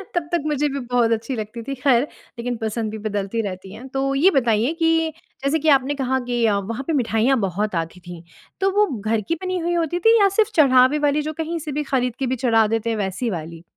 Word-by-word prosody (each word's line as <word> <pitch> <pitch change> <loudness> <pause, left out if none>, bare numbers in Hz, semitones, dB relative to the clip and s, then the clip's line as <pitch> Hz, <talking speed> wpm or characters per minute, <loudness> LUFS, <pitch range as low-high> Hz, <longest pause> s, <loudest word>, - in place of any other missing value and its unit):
तब 330 -2 -1
तक 345 -3 +1
मुझे 295 0 +1
भी 275 0 -3
बहुत 245 -2 +1
अच्छी 230 +3 -1
लगती 220 +2 -6
थी, 275 +3 -4
ख़ैर, 255 -2 +3 0.4
लेकिन 245 0 -3
पसंद 220 0 -2
भी 220 - -5
बदलती 205 +2 -2
रहती 190 -1 -6
है। 245 +5 -10
तो 275 0 0
ये 355 +8 +5
बताइए 230 +4 +1
कि, 325 -1 +2 0.3
जैसे 310 +3 +2
कि 310 +1 +1
आपने 270 +2 -4
कहा 260 +1 +1
कि 240 -2 +1
अ, 205 -2 +2
वहाँ 230 +7 -4
पे 325 - 0
मिठाइयाँ 245 0 +2
बहुत 195 0 -1
आती 180 +3 -16
थीं, 175 -2 -8 0.4
तो 390 0 +2
वो 420 - +5
घर 215 +1 0
की - - +3
बनी 370 0 -1
हुई 345 +1 -1
होती 340 +1 0
थी 450 +3 +5
या 400 -1 +5
सिर्फ़ 430 - +3
चढ़ावे 265 -1 +5
वाली, 295 +1 +1
जो 310 +1 -4
कहीं 325 +2 -3
से 300 -1 -6
भी 300 +2 -2
खरीद 250 -2 +1
के 265 - -1
भी 260 - 0
चढ़ा 225 -2 +4
देते 225 +1 -1
हैं, 225 - -1
वैसी 200 +4 -2
वाली? 165 -2 -6
250 Hz, 240 wpm, -22 LUFS, 220-300 Hz, 0.4 s, ये